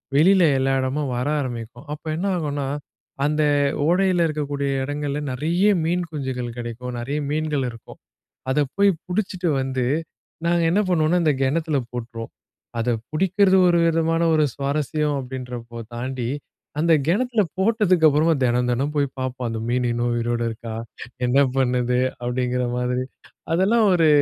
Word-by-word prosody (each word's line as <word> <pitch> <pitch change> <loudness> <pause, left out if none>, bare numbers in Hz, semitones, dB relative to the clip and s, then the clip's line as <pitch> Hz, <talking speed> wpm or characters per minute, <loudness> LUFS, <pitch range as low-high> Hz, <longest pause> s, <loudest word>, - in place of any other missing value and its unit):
வெளியில 185 +5 +5
எல்லா 135 0 +1
இடமும் 130 +1 -1
வர 125 +3 -1
ஆரம்பிக்கும். 120 -3 -5
அப்போ 150 +2 -10
என்ன 175 +5 -2
ஆகும்னா, 145 -4 -2 0.6
அந்த 150 +1 +1 0.5
ஓடையில 180 0 +3
இருக்கக்கூடிய 145 -2 -2
இடங்கள்ல 145 +1 -2
நிறைய 165 +9 +1 0.2
மீன் 175 +2 0
குஞ்சுகள் 130 -5 -4
கிடைக்கும், 120 +1 -5
நிறைய 140 +5 -3
மீன்கள் 150 -3 0
இருக்கும். 115 -1 -12 0.5
அத 135 - +1 0.2
போய் 200 0 +5 0.2
பிடிச்சுட்டு 185 -1 -1
வந்து, 130 -1 -1 0.6
நாங்க 170 0 +2
என்ன 195 +5 +3
பண்ணுவோம்னா, 175 0 +2
இந்த 150 - +4
கிணத்துல 155 +2 +1
போட்டுருவோம். 115 -1 -6 0.5
அத 115 +1 -1 0.2
பிடிக்குறது, 190 +3 +3
ஒரு 175 -1 +4
விதமான 165 0 +1
ஒரு 155 -1 +4
சுவாரஸ்யம். 150 +1 -1
அப்படின்றப்போ, 125 -2 -7 0.2
தாண்டி 125 0 -3 0.5
அந்த 165 +2 +3
கிணத்துல 225 +6 +2 0.2
போட்டதுக்கப்புறமா 175 -7 +4
தினம், 125 0 +2
தினம் 135 +4 0
போய் 145 -1 +2
பார்ப்போம். 130 -1 -3
"அந்த 115 -1 -3
மீன் 125 +1 +1
இன்னும் 120 +1 0
உயிரோட 120 0 -1
இருக்கா? 115 0 -7 0.5
என்ன 125 +3 +2 0.2
பண்ணுது?" 125 -1 +1 0.3
அப்படிங்கிற 125 +1 -1
மாரி, 125 +1 -1 0.5
அதெல்லாம் 205 +7 +3
ஒரு, 165 -3 +4
145 Hz, 135 wpm, -23 LUFS, 125-165 Hz, 0.6 s, வெளியில